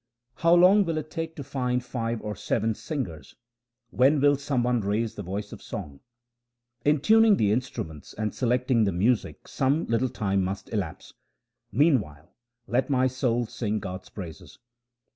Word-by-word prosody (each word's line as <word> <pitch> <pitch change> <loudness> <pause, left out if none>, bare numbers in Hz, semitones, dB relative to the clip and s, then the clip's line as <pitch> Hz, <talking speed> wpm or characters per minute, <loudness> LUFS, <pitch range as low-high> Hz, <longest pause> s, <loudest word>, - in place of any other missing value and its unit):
How 170 +1 +5
long 185 +4 +6
will 165 -3 -2
it 155 0 -5
take 165 -1 -4
to 145 - -6
find 125 -2 -1
five 115 -3 -3
or 105 -1 -4
seven 110 +2 0
singers? 105 - -6 0.6
When 140 +4 +4
will 145 +1 +5
some 140 -3 -1
one 120 -1 +1
raise 105 +3 -1
the - - -7
voice 100 +2 -5
of - - -10
song? 75 - -7 0.8
In 150 -1 +3
tuning 220 +2 +5
the 105 -1 +2
instruments 95 - -4
and 110 0 -2
selecting 125 -2 +2
the 100 - +1
music 105 +7 0
some 140 +5 +1
little 115 +3 +1
time 100 -4 0
must 95 +4 -5
elapse; 95 -8 -4 0.6
meanwhile 105 - +1 0.3
let 125 +5 0
my 130 -2 +3
soul 125 -2 0
sing 110 -1 -3
God's 95 -2 -6
praises. 85 -7 -9
120 Hz, 160 wpm, -26 LUFS, 105-140 Hz, 0.8 s, long